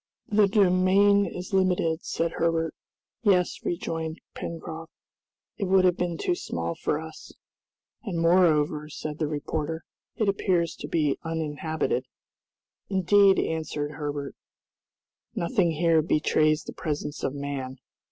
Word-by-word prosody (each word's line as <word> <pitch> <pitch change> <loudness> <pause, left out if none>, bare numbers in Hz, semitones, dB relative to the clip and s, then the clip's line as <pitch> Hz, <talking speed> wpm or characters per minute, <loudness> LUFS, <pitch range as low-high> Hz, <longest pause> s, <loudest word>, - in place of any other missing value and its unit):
"The 210 -1 +4
domain 195 +1 +4
is 180 +3 -7
limited," 180 -4 +1
said 165 0 -1
Herbert. 165 -1 0 0.5
"Yes," 185 -5 +2
rejoined 165 -1 -3
Pencroft: 165 0 -7 0.7
"It 200 - -1
would 190 0 +4
have 180 -1 +4
been 175 -2 -2
too 180 - 0
small 85 - -3
for 150 - -1
us." 160 0 -10 0.7
"And 190 -8 -3
moreover," 155 -3 +3
said 150 0 -6
the 155 - 0
reporter, 155 +2 -3 0.3
"it 220 -4 0
appears 185 -4 +1
to - - -6
be 150 -4 0
uninhabited." 160 - -2 0.8
"Indeed," 195 +1 +5
answered 155 -2 -2
Herbert, 145 -1 -4 1.0
"nothing 180 -1 +1
here 165 0 +3
betrays 155 0 +2
the - - -8
presence 150 -1 -4
of 135 - -1
man." 140 -2 -4
165 Hz, 125 wpm, -26 LUFS, 150-185 Hz, 1.0 s, Indeed